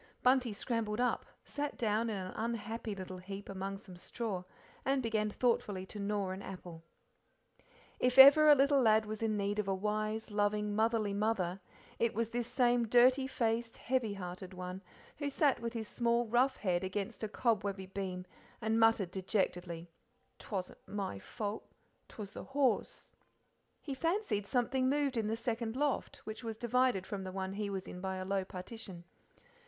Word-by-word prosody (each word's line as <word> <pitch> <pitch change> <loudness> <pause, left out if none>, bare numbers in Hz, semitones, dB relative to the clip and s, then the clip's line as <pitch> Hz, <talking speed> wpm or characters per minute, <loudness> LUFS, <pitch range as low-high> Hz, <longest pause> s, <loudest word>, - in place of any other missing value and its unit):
Bunty 255 -2 +4
scrambled 220 0 -2
up, 250 0 +1 0.2
sat 290 0 -3
down 225 0 +1
in 210 - -2
an 185 -1 -5
unhappy 225 -1 -3
little 185 -1 -7
heap 195 +2 -7
among 195 0 -4
some 195 -2 -12
straw, 195 +1 -4 0.4
and 270 -1 +1
began 215 -2 +1
thoughtfully 205 -5 0
to 210 - -8
gnaw 200 -1 -1
an 190 +1 -5
apple. 180 -4 -8 1.2
If 250 +1 +2
ever 285 +3 +10
a 295 - +10
little 280 0 +4
lad 220 -2 +5
was 215 0 -5
in 220 -2 +1
need 205 +1 -1
of 210 - -1
a 195 - +1
wise 215 +2 -2
loving, 205 0 +1
motherly 220 -2 +2
mother 200 -3 0 0.4
it 230 -2 +1
was 230 0 0
this 235 0 -2
same 245 -2 +2
dirty 255 +3 +5
faced, 230 -2 -1
heavyhearted 195 -7 -3
one 180 +1 -6 0.4
who 290 -1 -2
sat 280 -1 +2
with 230 0 -4
his 225 -2 -4
small 235 +1 +1
rough 245 +4 +2
head 180 -3 0
against 200 +4 -3
a - - 0
cobwebby 205 -4 0
beam 185 -1 -4 0.3
and 220 +1 +1
muttered 225 -5 +4
dejectedly, 180 -3 -1 0.5
"'Twasn't 190 -4 -5
my 195 - -3
fault: 210 - -5 0.4
'Twas 205 -3 -8
the - - -7
horse:" 270 -1 0 0.7
He 285 - -4
fancied 330 - 0
something 255 +2 +1
moved 285 -1 +1
in 225 -2 0
the 220 +1 -1
second 230 -1 -2
loft, 285 0 -1
which 220 +1 -7
was 225 -1 -4
divided 245 -4 +2
from 195 -1 -4
the 185 - -5
one 190 0 -3
he 205 0 -2
was 195 -1 -4
in 180 - -7
by 190 0 -2
a 185 0 -4
low 195 0 0
partition. 185 -1 -8
215 Hz, 170 wpm, -34 LUFS, 195-240 Hz, 1.2 s, ever